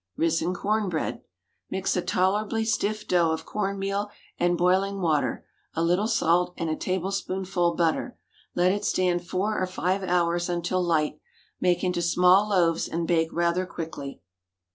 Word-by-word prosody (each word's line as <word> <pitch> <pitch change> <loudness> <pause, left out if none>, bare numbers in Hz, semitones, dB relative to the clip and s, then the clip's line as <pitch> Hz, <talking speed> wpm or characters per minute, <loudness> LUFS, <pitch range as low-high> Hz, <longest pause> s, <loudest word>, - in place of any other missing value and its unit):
RISEN 165 +2 +1
CORN 210 +2 0
BREAD. 160 -3 -3 0.5
Mix 190 0 -1
a 180 - +1
tolerably 200 +5 0
stiff 215 -1 -1
dough 175 -2 +3
of 160 0 -2
corn 200 -1 -2
meal 195 +1 -2 0.3
and 175 0 +2
boiling 190 +3 +2
water, 160 -5 0 0.3
a 165 - 0
little 180 +5 +2
salt, 180 -5 +2
and 165 -1 -2
a - - 0
tablespoonful 185 -1 -1
butter. 170 +9 0 0.4
Let 180 +1 +3
it 205 +1 -2
stand 180 -3 0
four 205 +4 -1
or 185 - 0
five 185 +1 -1
hours 175 -1 +1
until 175 +1 0
light; 155 -3 0 0.4
make 180 0 +1
into 180 -1 0
small 180 +4 +4
loaves 170 -5 +2
and 165 0 -2
bake 165 -2 +2
rather 170 +2 0
quickly. 160 -6 -7
180 Hz, 155 wpm, -26 LUFS, 170-195 Hz, 0.5 s, small